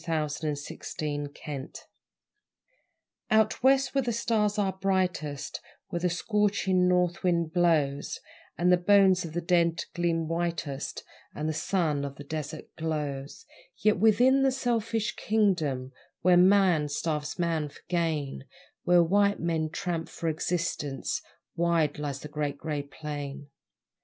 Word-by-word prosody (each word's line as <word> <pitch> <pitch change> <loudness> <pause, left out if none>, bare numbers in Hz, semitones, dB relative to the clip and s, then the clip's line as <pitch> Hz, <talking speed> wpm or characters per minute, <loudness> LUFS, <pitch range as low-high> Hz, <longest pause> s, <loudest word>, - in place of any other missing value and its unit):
The - - -17 0.6
Great - - -9
Grey 150 -1 -2
Plain 145 -1 -7 1.6
Out 220 -1 +3
West, 270 +1 +4
where 275 - +3
the 240 -2 -1
stars 215 -2 +1
are 195 -2 +1
brightest, 180 -7 -1 0.3
Where 175 - -2
the 180 +1 +1
scorching 190 0 +1
north 180 -1 +2
wind 170 -3 +1
blows, 155 -5 +1 0.4
And 180 +1 +3
the 180 - +6
bones 190 -1 +4
of 160 - -7
the 175 - -1
dead 170 -1 +2
gleam 165 -2 0
whitest, 165 -4 -3 0.3
And 150 - -2
the 155 - 0
sun 155 -4 0
on 140 -1 -5
a 145 - -8
desert 155 +1 -6
glows 150 -4 -4 0.3
Yet 215 -2 +2
within 245 +6 +5
the 270 0 +4
selfish 230 -4 -1
kingdom 165 -12 +1 0.3
Where 180 0 +5
man 180 -4 +5
starves 150 0 -2
man 165 -4 0
for 145 - -17
gain, 160 -6 -1 0.4
Where 175 -1 +5
white 200 +4 +2
men 160 -2 -1
tramp 165 0 -3
for 165 - -3
existence 155 -4 -2 0.3
Wide 165 -3 +1
lies 140 -2 -4
the - - -7
Great 145 -1 -3
Grey 150 -1 -3
Plain. 145 -1 -7
170 Hz, 135 wpm, -28 LUFS, 150-190 Hz, 1.6 s, the